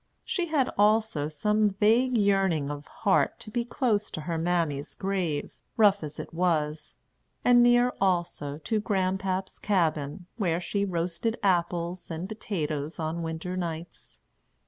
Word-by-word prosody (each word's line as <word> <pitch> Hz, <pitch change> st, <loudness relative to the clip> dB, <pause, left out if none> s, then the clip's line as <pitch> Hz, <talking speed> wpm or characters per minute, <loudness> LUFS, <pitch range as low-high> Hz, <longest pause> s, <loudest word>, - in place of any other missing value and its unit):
She 355 Hz, -2 st, -1 dB
had 295 Hz, -5 st, +2 dB
also 210 Hz, -7 st, +3 dB
some 210 Hz, +8 st, +2 dB
vague 225 Hz, +6 st, +3 dB
yearning 195 Hz, -8 st, +2 dB
of 145 Hz, 0 st, -7 dB
heart 200 Hz, -3 st, +1 dB
to 215 Hz, -, -9 dB
be 240 Hz, +1 st, 0 dB
close 230 Hz, -3 st, 0 dB
to 155 Hz, -, -5 dB
her 165 Hz, +2 st, -3 dB
mammy's 160 Hz, -4 st, -1 dB
grave, 185 Hz, -7 st, -2 dB, 0.2 s
rough 205 Hz, -4 st, +5 dB
as 150 Hz, 0 st, -7 dB
it -, -, -7 dB
was; 155 Hz, -3 st, -1 dB, 0.5 s
and 245 Hz, -1 st, +7 dB
near 240 Hz, +1 st, +5 dB
also 170 Hz, -6 st, 0 dB
to 215 Hz, +8 st, -1 dB
Grandpap's 190 Hz, -2 st, -1 dB
cabin, 160 Hz, -4 st, 0 dB
where 175 Hz, -6 st, +1 dB
she 200 Hz, +3 st, -1 dB
roasted 180 Hz, +5 st, -2 dB
apples 175 Hz, -1 st, 0 dB
and 165 Hz, +3 st, -4 dB
potatoes 160 Hz, -8 st, -3 dB
on 160 Hz, +1 st, -3 dB
winter 165 Hz, +2 st, -4 dB
nights. 170 Hz, -1 st, -6 dB
180 Hz, 140 wpm, -27 LUFS, 160-210 Hz, 0.5 s, and